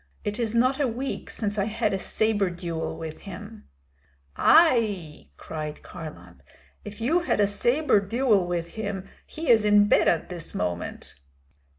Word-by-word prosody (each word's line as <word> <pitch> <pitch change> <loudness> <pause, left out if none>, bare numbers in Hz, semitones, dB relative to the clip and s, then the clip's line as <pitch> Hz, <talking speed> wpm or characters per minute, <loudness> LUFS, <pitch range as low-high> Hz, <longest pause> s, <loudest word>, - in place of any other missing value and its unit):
It 210 +2 -3
is 230 -1 -1
not 255 +4 +3
a 280 - +2
week 250 +4 -4
since 210 -1 -2
I 200 - +1
had 215 -1 -1
a 195 - -1
sabre 205 -1 +1
duel 170 -2 -4
with 160 -1 -7
him." 70 - -10 0.7
"Ai!" 215 - +3
cried 155 -1 -6
Kharlamp. 160 -3 -10 0.4
"If 210 +1 -9
you 305 +10 +2
had 345 - -1
a 205 - +5
sabre 240 +6 +2
duel 210 -2 +1
with 170 -1 -2
him, 200 -2 -5 0.2
he 315 -2 -5
is 220 -2 +5
in 205 0 +5
bed - - +4
at 165 - +1
this 175 -3 -6
moment." 90 -1 -4
205 Hz, 160 wpm, -26 LUFS, 175-235 Hz, 0.7 s, a